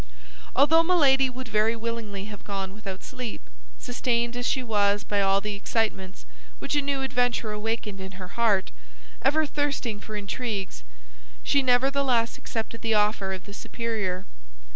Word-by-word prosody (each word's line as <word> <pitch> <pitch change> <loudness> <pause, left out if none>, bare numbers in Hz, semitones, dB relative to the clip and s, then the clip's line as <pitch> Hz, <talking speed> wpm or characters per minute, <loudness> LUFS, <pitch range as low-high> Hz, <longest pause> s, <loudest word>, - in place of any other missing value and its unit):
Although 305 +5 +6
Milady 280 -7 +4
would 255 0 -7
very 220 +1 +2
willingly 225 -4 -4
have 205 -1 -9
gone 195 -2 -4
without 195 -3 -7
sleep, 250 -3 -5 0.4
sustained 240 -1 0
as 245 0 -1
she 260 - +1
was 205 -3 +2
by 205 -1 +1
all 195 0 +3
the 210 +1 -3
excitements 200 -2 -2 0.3
which - - -2
a 290 - +3
new 275 -1 -1
adventure 245 -4 +1
awakened 210 -2 -3
in 190 +1 -7
her 185 -1 -8
heart, 210 -4 +2 0.5
ever 310 +2 +3
thirsting 280 -7 -1
for 215 +1 -8
intrigues, 205 - -3 0.6
she 280 - +3
nevertheless 255 -2 +2
accepted 225 0 -4
the 225 -1 +1
offer 210 -2 +2
of 190 -1 -5
the 200 - -10
superior. 210 -5 -3
225 Hz, 150 wpm, -27 LUFS, 200-255 Hz, 0.6 s, Although